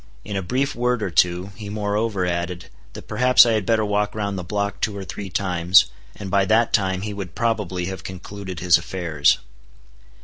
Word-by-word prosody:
In 100 Hz, -, -5 dB
a 95 Hz, -, -1 dB
brief 130 Hz, +10 st, -1 dB
word 125 Hz, -1 st, 0 dB
or 95 Hz, -, -2 dB
two, 90 Hz, +3 st, +2 dB
he 105 Hz, +1 st, -8 dB
moreover 105 Hz, -1 st, -1 dB
added, 85 Hz, 0 st, -3 dB, 0.2 s
that -, -, -10 dB
perhaps 125 Hz, 0 st, +6 dB
I 120 Hz, -, +2 dB
had 110 Hz, -3 st, 0 dB
better 110 Hz, -2 st, +2 dB
walk 105 Hz, 0 st, -1 dB
round 100 Hz, -2 st, -2 dB
the 90 Hz, -, -4 dB
block 100 Hz, +3 st, -3 dB
two 105 Hz, -2 st, -1 dB
or 100 Hz, -, -5 dB
three 100 Hz, +1 st, -7 dB
times, 90 Hz, -1 st, +3 dB, 0.2 s
and 100 Hz, -3 st, -7 dB
by 100 Hz, 0 st, +3 dB
that 110 Hz, +4 st, +2 dB
time 95 Hz, -1 st, +1 dB
he 105 Hz, +1 st, -4 dB
would 95 Hz, -5 st, -7 dB
probably 105 Hz, -6 st, -1 dB
have 95 Hz, -2 st, -6 dB
concluded 95 Hz, -1 st, -8 dB
his 90 Hz, -2 st, +5 dB
affairs. 80 Hz, -6 st, +1 dB
100 Hz, 195 wpm, -22 LUFS, 90-105 Hz, 0.2 s, perhaps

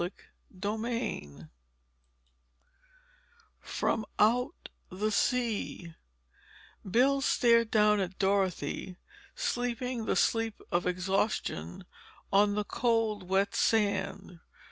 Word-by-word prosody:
Chapter 200 Hz, +3 st, -6 dB
XI 230 Hz, -, -3 dB, 2.3 s
FROM 220 Hz, -, -1 dB
OUT 250 Hz, +8 st, +1 dB, 0.2 s
THE 210 Hz, +4 st, -2 dB
SEA 215 Hz, -7 st, -1 dB, 1.0 s
Bill 270 Hz, +7 st, +3 dB
stared 230 Hz, -3 st, +3 dB
down 210 Hz, -1 st, +4 dB
at 190 Hz, -1 st, -3 dB
Dorothy 190 Hz, -3 st, -1 dB, 0.4 s
sleeping 245 Hz, -, -2 dB
the -, -, +1 dB
sleep 225 Hz, -1 st, +1 dB
of 175 Hz, +1 st, +1 dB
exhaustion 180 Hz, -, -1 dB, 0.5 s
on 205 Hz, +1 st, +4 dB
the 210 Hz, 0 st, -1 dB
cold, 220 Hz, -5 st, 0 dB
wet 195 Hz, +1 st, +2 dB
sand. 195 Hz, -4 st, 0 dB
210 Hz, 85 wpm, -30 LUFS, 190-230 Hz, 2.3 s, down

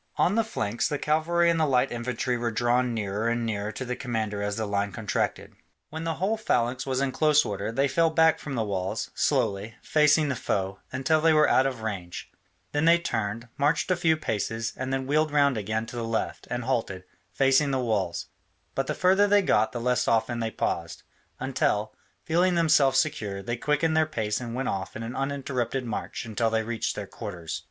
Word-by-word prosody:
On 180 Hz, -, +3 dB
the 225 Hz, +1 st, +3 dB
flanks, 120 Hz, -, -2 dB
the 150 Hz, -3 st, -2 dB
cavalry 160 Hz, +4 st, +2 dB
and 165 Hz, -, 0 dB
the 155 Hz, -, +3 dB
light 130 Hz, -1 st, +2 dB
infantry 120 Hz, +1 st, -2 dB
were 120 Hz, 0 st, -1 dB
drawn 120 Hz, +2 st, +1 dB
nearer 105 Hz, 0 st, -2 dB
and 120 Hz, 0 st, -1 dB
nearer 105 Hz, -1 st, -2 dB
to 130 Hz, -, -5 dB
the 125 Hz, 0 st, -3 dB
commander 110 Hz, -6 st, -3 dB
as 105 Hz, 0 st, -2 dB
the 110 Hz, -, -1 dB
line 100 Hz, 0 st, -1 dB
contracted. 105 Hz, +1 st, -2 dB, 0.4 s
When 160 Hz, +1 st, -5 dB
the 165 Hz, -1 st, -1 dB
whole 200 Hz, +7 st, 0 dB
phalanx 125 Hz, -, 0 dB
was 130 Hz, 0 st, 0 dB
in 140 Hz, -1 st, 0 dB
close 150 Hz, +1 st, +3 dB
order, 105 Hz, +2 st, -3 dB
they 135 Hz, +4 st, +2 dB
fell 165 Hz, +4 st, +2 dB
back 160 Hz, 0 st, +4 dB
from 140 Hz, -3 st, -5 dB
the 115 Hz, -, 0 dB
walls, 95 Hz, -3 st, -3 dB
slowly, 100 Hz, +3 st, 0 dB
facing 150 Hz, 0 st, +4 dB
the 135 Hz, -, -1 dB
foe, 95 Hz, -3 st, -2 dB
until 135 Hz, +4 st, +1 dB
they 165 Hz, 0 st, +5 dB
were 150 Hz, 0 st, +5 dB
out 130 Hz, -, +4 dB
of 125 Hz, -4 st, -5 dB
range; 95 Hz, -5 st, -5 dB, 0.4 s
then 145 Hz, +2 st, +1 dB
they 170 Hz, +1 st, +7 dB
turned, 110 Hz, -7 st, -3 dB
marched 150 Hz, +5 st, +1 dB
a -, -, +4 dB
few 165 Hz, -2 st, +2 dB
paces, 115 Hz, -3 st, -2 dB
and 130 Hz, +1 st, -4 dB
then 135 Hz, 0 st, -1 dB
wheeled 155 Hz, +3 st, +2 dB
round 140 Hz, -2 st, +3 dB
again 110 Hz, +1 st, -2 dB
to 120 Hz, -, -10 dB
the 120 Hz, -, -3 dB
left, 115 Hz, 0 st, -3 dB
and 125 Hz, 0 st, -2 dB
halted, 115 Hz, -7 st, -2 dB, 0.3 s
facing 135 Hz, +2 st, +3 dB
the 135 Hz, -, 0 dB
walls, 100 Hz, -9 st, -1 dB, 0.5 s
but 135 Hz, 0 st, -1 dB
the -, -, -1 dB
further 190 Hz, +3 st, +4 dB
they 205 Hz, 0 st, +4 dB
got 110 Hz, -, +2 dB
the 120 Hz, -, -4 dB
less 125 Hz, +1 st, +1 dB
often 115 Hz, +1 st, +1 dB
they 115 Hz, -1 st, -1 dB
paused, 85 Hz, -6 st, -3 dB, 0.4 s
until, -, -, 0 dB, 0.3 s
feeling 175 Hz, +2 st, +2 dB
themselves 150 Hz, -5 st, +4 dB
secure, 105 Hz, -11 st, -1 dB
they 120 Hz, +4 st, -2 dB
quickened 150 Hz, +5 st, +1 dB
their 160 Hz, 0 st, +3 dB
pace 110 Hz, -6 st, -2 dB
and 120 Hz, -1 st, -5 dB
went 130 Hz, 0 st, -2 dB
off 95 Hz, -1 st, -3 dB
in 115 Hz, -, -5 dB
an 115 Hz, +2 st, -6 dB
uninterrupted 135 Hz, -2 st, -2 dB
march 115 Hz, +1 st, -4 dB
until 115 Hz, +1 st, 0 dB
they 110 Hz, 0 st, 0 dB
reached 115 Hz, 0 st, -2 dB
their -, -, -4 dB
quarters. 85 Hz, -2 st, -6 dB
125 Hz, 205 wpm, -26 LUFS, 110-150 Hz, 0.5 s, they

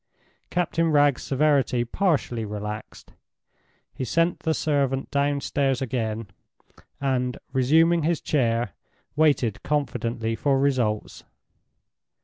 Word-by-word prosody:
Captain 165 Hz, -1 st, 0 dB
Wragge's 145 Hz, -3 st, +3 dB
severity 135 Hz, -4 st, +1 dB
partially 140 Hz, -, 0 dB
relaxed. 105 Hz, 0 st, -7 dB, 0.8 s
He -, -, -5 dB
sent 165 Hz, +7 st, +1 dB
the 160 Hz, -1 st, 0 dB
servant 140 Hz, -3 st, 0 dB
downstairs 140 Hz, -1 st, 0 dB
again, 115 Hz, -4 st, -2 dB, 0.7 s
and, 125 Hz, -2 st, -1 dB, 0.2 s
resuming 160 Hz, +6 st, +4 dB
his 165 Hz, +1 st, +1 dB
chair, 115 Hz, -, 0 dB, 0.4 s
waited 140 Hz, -9 st, +2 dB
confidently 120 Hz, -6 st, -1 dB
for 135 Hz, +3 st, +1 dB
results. 125 Hz, -6 st, 0 dB
135 Hz, 95 wpm, -25 LUFS, 120-150 Hz, 0.8 s, resuming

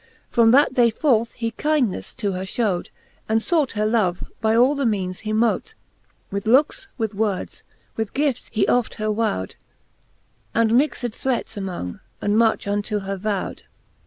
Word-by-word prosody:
From 230 Hz, -1 st, +5 dB
that 270 Hz, +2 st, +5 dB
day 240 Hz, -2 st, +5 dB
forth 230 Hz, -1 st, +1 dB
he 230 Hz, -2 st, -3 dB
kyndneffe 250 Hz, -, -1 dB
to 200 Hz, -, -1 dB
her 185 Hz, 0 st, -3 dB
fiiowed, 190 Hz, -2 st, -1 dB, 0.4 s
And 220 Hz, 0 st, +2 dB
fought 315 Hz, -6 st, +1 dB
her 210 Hz, -1 st, 0 dB
love,' 215 Hz, -5 st, +1 dB, 0.2 s
by 220 Hz, 0 st, +2 dB
all 250 Hz, +5 st, +5 dB
the 280 Hz, -1 st, -2 dB
meanes 190 Hz, -6 st, -1 dB
he 215 Hz, -, -4 dB
mote; 235 Hz, -, +1 dB, 0.6 s
With 200 Hz, +2 st, -3 dB
looks, 285 Hz, -, +3 dB
with 220 Hz, -3 st, -2 dB
words, 205 Hz, -2 st, -2 dB, 0.3 s
with 220 Hz, -2 st, -3 dB
gifts 280 Hz, -3 st, 0 dB
he 215 Hz, -2 st, +1 dB
oft 245 Hz, -2 st, +1 dB
her 215 Hz, -1 st, -1 dB
wowed: 210 Hz, -, -1 dB, 1.0 s
And 230 Hz, 0 st, +3 dB
mixed 265 Hz, -1 st, +2 dB
threats 260 Hz, 0 st, -2 dB
among, 180 Hz, -, -5 dB, 0.2 s
and 205 Hz, 0 st, 0 dB
much 225 Hz, 0 st, +3 dB
unto 205 Hz, +1 st, -1 dB
her 195 Hz, 0 st, -3 dB
vowed. 200 Hz, 0 st, -3 dB
220 Hz, 160 wpm, -22 LUFS, 200-245 Hz, 1.0 s, From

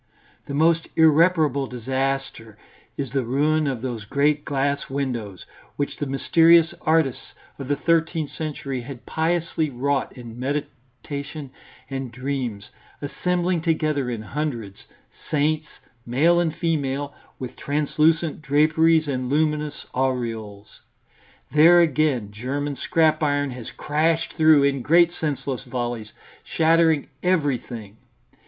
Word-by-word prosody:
The 140 Hz, -, -4 dB
most 165 Hz, +2 st, +3 dB
irreparable 160 Hz, -3 st, +4 dB
disaster 130 Hz, -3 st, -3 dB, 0.4 s
is 135 Hz, -4 st, -4 dB
the 135 Hz, -1 st, 0 dB
ruin 150 Hz, +5 st, +1 dB
of 130 Hz, -3 st, -3 dB
those 120 Hz, -4 st, -4 dB
great 145 Hz, +6 st, +1 dB
glass 140 Hz, 0 st, -1 dB
windows, 120 Hz, -9 st, -4 dB, 0.3 s
which 145 Hz, -, -3 dB
the 145 Hz, -, -3 dB
mysterious 165 Hz, +4 st, +4 dB
artists 155 Hz, -5 st, 0 dB, 0.3 s
of 135 Hz, -, -6 dB
the 145 Hz, -, +1 dB
thirteenth 165 Hz, 0 st, 0 dB
century 140 Hz, -5 st, -4 dB
had 125 Hz, 0 st, -10 dB
piously 160 Hz, -1 st, -1 dB
wrought 135 Hz, +2 st, -1 dB
in 120 Hz, -1 st, -10 dB
meditation 140 Hz, +1 st, -5 dB, 0.4 s
and 135 Hz, -2 st, -5 dB
dreams, 125 Hz, -5 st, -4 dB, 0.3 s
assembling 175 Hz, +4 st, -1 dB
together 155 Hz, -5 st, 0 dB
in 115 Hz, -3 st, -4 dB
hundreds, 115 Hz, -5 st, -5 dB, 0.4 s
saints, 155 Hz, +1 st, +1 dB, 0.4 s
male 150 Hz, +9 st, +3 dB
and 165 Hz, -2 st, 0 dB
female, 145 Hz, -3 st, -1 dB, 0.2 s
with 130 Hz, -2 st, -7 dB
translucent 155 Hz, +2 st, 0 dB
draperies 155 Hz, +2 st, +3 dB
and 130 Hz, -3 st, -2 dB
luminous 150 Hz, 0 st, -1 dB
aureoles. 115 Hz, -6 st, -3 dB, 0.7 s
There 165 Hz, +4 st, +7 dB
again 150 Hz, -9 st, +1 dB
German 140 Hz, +7 st, -3 dB
scrap 155 Hz, +2 st, +2 dB
iron 145 Hz, -2 st, +1 dB
has 125 Hz, -2 st, -8 dB
crashed 160 Hz, +2 st, 0 dB
through 155 Hz, -2 st, +5 dB
in 140 Hz, -1 st, +1 dB
great 170 Hz, +5 st, +4 dB
senseless 140 Hz, -5 st, -3 dB
volleys, 120 Hz, -3 st, -4 dB, 0.3 s
shattering 160 Hz, -2 st, +2 dB
everything. 125 Hz, -, -1 dB
145 Hz, 115 wpm, -23 LUFS, 130-155 Hz, 0.7 s, There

